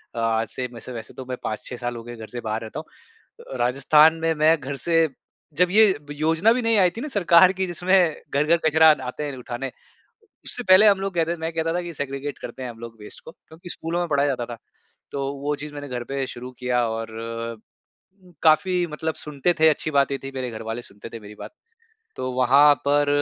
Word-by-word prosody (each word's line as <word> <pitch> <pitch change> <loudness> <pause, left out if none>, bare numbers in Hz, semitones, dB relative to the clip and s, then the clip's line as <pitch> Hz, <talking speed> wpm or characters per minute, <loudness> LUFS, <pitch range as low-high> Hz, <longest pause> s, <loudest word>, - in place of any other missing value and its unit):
अ, - - -3
आज 115 0 +1
से 125 -1 -4
मैं 115 - -9
से - - -9
वैसे 115 -1 -8
तो 130 - -8
मैं 125 - -3
5-6 120 +3 -5
साल 120 0 -4
हो 115 - -7
गए, 120 0 -9
घर 110 -1 -9
से 120 +1 -7
बाहर 110 0 -3
रहता 110 -1 -6
हूँ। - - -18
अ, - - -4
राजस्थान 140 +6 +4
में 165 0 +1
मैं 155 +2 +4
घर 140 +1 -5
से 165 -1 +4 0.5
जब 180 0 +3
ये 215 0 +6 0.2
ब - - -6
योजना 165 +7 +3
भी 250 - -1
नहीं 225 -1 +2
आई 180 -2 +5
थी - - -4
ना 300 - -4
सरकार 185 - +5
की 190 0 -1
जिसमें 175 -1 +2
घर-घर 150 +5 +2
कचरा 160 +1 +6
आन 150 - 0
आते 125 +3 -5
हैं 140 -3 -5
उठाने। 125 +1 -5 0.7
उससे 245 - -2
पहले 190 +3 +8
हम 200 -2 +5
लोग 195 -1 -3
कहते 170 0 0
मैं 160 0 -4
कहता 165 0 -1
था 180 - -1
कि, 175 -1 -7
"सेग्रिगेट 140 0 -5
करते 125 +2 -8
हैं 125 - -5
हम 115 - -13
लोग 115 -1 -9
वेस्ट 105 - -11
को" - - -9
क्योंकि 165 +2 -15
स्कूलों 165 +1 -3
में 175 - -2
पढ़ाया 145 -1 +2
जाता 125 -4 -2
था। 115 - -15 0.5
तो 140 0 -2
वो 145 +1 0
चीज़ 150 +1 -8
मैंने 145 0 -7
घर 125 -2 -4
पे 135 +2 -3
शुरू 125 0 -8
किया 125 -1 +1
और 115 0 -4 1.3
काफ़ी 180 +3 +3
मतलब 160 +1 -4
सुनते 150 +4 -1
थे, 160 - +7
अच्छी 155 0 -1
बात 140 -1 +2
ये 140 - -1
थी 135 - -6
मेरे 130 -2 -3
घर 110 - -7
वाले 115 +2 -4
सुनते 105 +1 -12
थे 115 - -8
मेरी 105 0 -12
बात। - - -9 0.6
तो 130 0 -3
वहाँ 140 +4 +6
पर 145 0 +3
145 Hz, 235 wpm, -23 LUFS, 125-165 Hz, 1.3 s, पहले